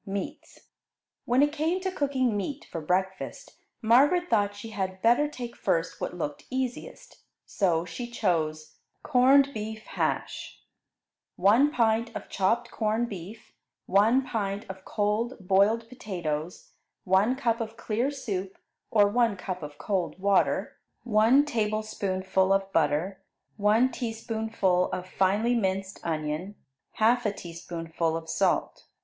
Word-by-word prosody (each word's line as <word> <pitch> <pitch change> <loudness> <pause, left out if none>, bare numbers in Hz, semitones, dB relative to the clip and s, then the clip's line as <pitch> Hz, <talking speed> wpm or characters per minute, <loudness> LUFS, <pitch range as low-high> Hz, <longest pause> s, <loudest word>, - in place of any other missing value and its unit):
MEATS 195 0 -6 0.6
When 250 +4 +4
it 290 - +2
came 320 +4 0
to 375 0 -2
cooking 265 - 0
meat 270 +9 -4
for 165 - -4
breakfast, 190 +4 -3 0.2
Margaret 290 +11 +4
thought 205 -2 +2
she 210 +2 -8
had 190 -2 -3
better 240 +6 +4
take 245 -5 -7
first 165 +1 -1
what 180 - -4
looked 145 -4 -4
easiest, 260 - -5 0.2
so 175 -4 +1
she 240 +8 -6
chose 155 -8 -1 0.3
Corned 275 +1 +5
Beef 220 0 -5
Hash - - -3 0.8
1 225 +10 +5
pint 230 -4 +1
of - - -6
chopped 230 +5 0
corned 225 +2 0
beef. 195 +3 -9 0.3
1 225 +7 +4
pint 205 -4 -3
of 190 0 -9
cold 215 +4 0
boiled 200 +4 +2
potatoes. 175 -9 -5 0.3
1 195 +7 +3
cup 235 -3 0
of 225 0 -5
clear 230 +4 -1
soup, 195 -9 -4 0.3
or 205 -2 +5
one 230 -1 +2
cup 185 -1 -5
of 145 -1 -8
cold 185 -2 -2
water. 195 +1 +1 0.3
1 235 +5 +4
tablespoonful 210 -6 0
of 195 0 +1
butter. 165 +5 +1 0.4
1 220 +5 +3
teaspoonful 220 -6 -1
of 180 0 -4
finely 200 +6 +2
minced 195 -3 -1
onion. 160 +4 -3 0.4
1/2 220 -1 +3
teaspoonful 165 -1 -3
of 165 0 -8
salt. - - 0
210 Hz, 130 wpm, -27 LUFS, 185-240 Hz, 0.8 s, Corned